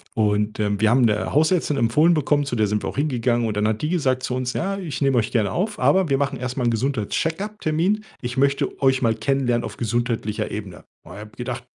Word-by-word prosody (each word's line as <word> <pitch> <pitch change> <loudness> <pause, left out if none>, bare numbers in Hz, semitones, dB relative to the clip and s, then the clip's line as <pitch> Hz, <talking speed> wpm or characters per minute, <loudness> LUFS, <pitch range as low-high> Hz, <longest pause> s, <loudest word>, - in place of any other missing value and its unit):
Und, 105 -1 0
ähm, 105 -1 0
wir 110 -1 +3
haben 125 +2 +4
'ne 105 -1 0
Hausärztin 155 -1 +2
empfohlen 150 +9 +3
bekommen, 145 -1 +1
zu 125 - -3
der 110 -2 +2
sind 105 0 -1
wir - - -2
auch - - -9
hingegangen 120 -5 +1
und 105 -1 -3
dann 105 +1 +2
hat 110 0 -1
die 150 - -1
gesagt 130 -7 0
zu 125 - -2
uns: 125 -1 -2
„Ja, 195 +3 -2
ich 160 -8 -5
nehme 135 -2 +2
euch 110 -1 0
gerne 105 -4 +1
auf, 205 +4 -2
aber 190 -4 +3
wir 135 - +2
machen 140 -1 -1
erst 125 +1 -4
mal 125 - 0
'n 120 - +3
Gesundheits-Check-Up-Termin. 165 - -1 0.2
Ich 120 0 -5
möchte 140 +1 0
euch 130 -1 +3
mal 115 -2 +3
kennenlernen 120 0 0
auf - - -8
gesundheitlicher 115 -2 -2
Ebene.“ 100 -4 -7 0.2
Und 85 - -12
ich - - -9
habe 105 0 -10
gedacht: 125 0 -5
125 Hz, 235 wpm, -22 LUFS, 110-150 Hz, 0.2 s, haben